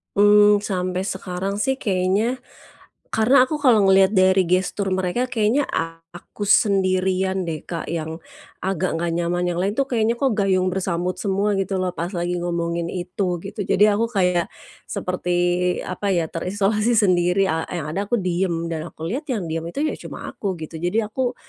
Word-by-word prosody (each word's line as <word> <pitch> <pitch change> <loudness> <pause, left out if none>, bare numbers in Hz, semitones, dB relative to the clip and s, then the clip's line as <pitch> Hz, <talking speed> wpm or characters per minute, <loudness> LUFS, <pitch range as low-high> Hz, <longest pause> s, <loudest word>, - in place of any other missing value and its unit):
Mmm, 205 0 +6
sampai 185 -2 -2
sekarang 190 0 -3
sih, 240 +6 +1
kayaknya 200 +6 +1 0.7
karena 225 +5 +3
aku 300 +4 -1
kalau 250 -8 +4
ngelihat 195 +1 +5
dari 185 -1 +4
gestur 185 +2 0
mereka 190 +7 0
kayaknya 250 +3 +1 0.5
aku 175 +3 -10
sendirian 190 -2 +2
deh 165 -3 -5
Kak, 165 -2 -5
yang 160 0 -4 0.4
agak 185 -2 -1
enggak 170 +1 -1
nyaman. 175 +1 0
Yang 175 - -3
lain 195 +3 0
tuh 275 +3 0
kayaknya 230 -1 +2
kok 265 +3 +1
gayung 185 -2 +2
bersambut 180 -1 -2
semua 200 0 0
gitu 190 -1 -1
loh 185 - 0
pas 175 +4 -3
lagi 175 0 -1
ngomongin 170 -1 -2
itu, 180 0 -3
gitu. 200 +2 -7
Jadi, 205 - +4
aku 220 +3 +1
kayak 180 -6 +1 0.4
seperti 180 -1 -3 0.5
apa 185 +2 -5
ya 165 -2 -1
terisolasi 205 +6 0
sendiri, 190 -2 +3
a 160 0 -1
yang 155 -3 -3
ada 200 +5 -2
aku 240 - -1
diem 170 -2 -1
dan 160 -1 -4
aku - - -13
lihat 275 +7 -3
yang 190 -9 -3
diem 165 +1 -3
itu 280 - -3
ya 310 - 0
cuma - - -8
aku, 195 -3 -3
gitu. 160 +1 -7
Jadi, 180 +7 0
aku 245 +4 -2
190 Hz, 170 wpm, -22 LUFS, 175-210 Hz, 0.7 s, Mmm